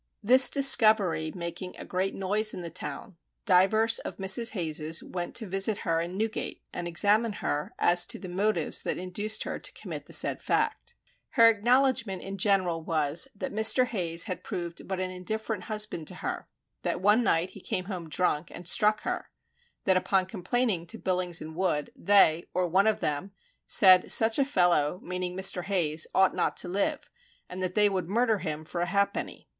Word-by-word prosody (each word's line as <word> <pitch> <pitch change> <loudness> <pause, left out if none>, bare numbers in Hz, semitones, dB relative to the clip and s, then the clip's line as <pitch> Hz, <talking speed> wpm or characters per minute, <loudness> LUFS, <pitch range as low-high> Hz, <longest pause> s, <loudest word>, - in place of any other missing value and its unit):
This 255 +4 +8
discovery 215 - +4
making 175 +1 -6
a - - -8
great 185 +1 -2
noise 210 +3 0
in 180 - -7
the 170 - -6
town, 185 +2 -6 0.3
divers 215 +3 +4
of - - -7
Mrs. 195 +5 +2
Hayes's 160 -3 -2
went 175 -1 -5
to 225 - +1
visit 195 +2 +1
her 165 -2 0
in 175 +2 -6
Newgate 220 +1 -4
and 175 -1 -5
examine 205 +6 +2
her 150 -6 -4
as 175 0 +3
to - - -2
the 190 - -9
and 175 - -8
motives 195 -5 0
that - - -3
induced 205 +4 -1
her - - -5
to - - -4
commit - - -8
the - - -13
said - - +2
fact. - - -1 0.4
Her 230 -5 +6
acknowledgment 235 -2 +1
in 195 0 -7
general 185 -4 +1
was: 160 - -1
that 200 - -6
Mr. 220 +4 +4
Hayes 170 -8 -2
had 185 -4 -6
proved 175 -4 -6
but 190 -1 -4
an 185 0 -3
indifferent 210 +2 -4
husband 210 -7 -4
to - - -3
her; - - -5 0.3
that - - -2
one 210 +5 +3
night 170 -3 +1
he 200 - -13
came 185 - -3
home 180 -4 -7
drunk 165 -1 -1
and 175 - -10
struck 215 +3 +2
her; - - -4 0.5
that 190 -1 +3
upon 185 0 +1
complaining 190 -1 -2
to - - -6
Billings 180 -3 -1
and 160 0 -10
Wood 170 -5 -1
they, 175 -5 +3
or 180 0 +1
one 190 +5 +2
of 220 - 0
them, 150 +7 -3 0.3
said 185 -2 +6
such 225 +3 +3
a 275 - +3
fellow 175 - +1
(meaning 180 0 -4
Mr. 190 -2 -1
Hayes) 165 -5 0
ought 190 0 +3
not - - -1
to - - -2
live, 195 +3 -2 0.4
and 185 +1 -8
that 185 -1 -3
they 210 -1 +4
would 185 -4 -3
murder 225 0 +1
him 155 -3 -5
for 170 +2 -5
a 175 - -1
halfpenny. 200 +2 -2
185 Hz, 190 wpm, -27 LUFS, 175-215 Hz, 0.5 s, This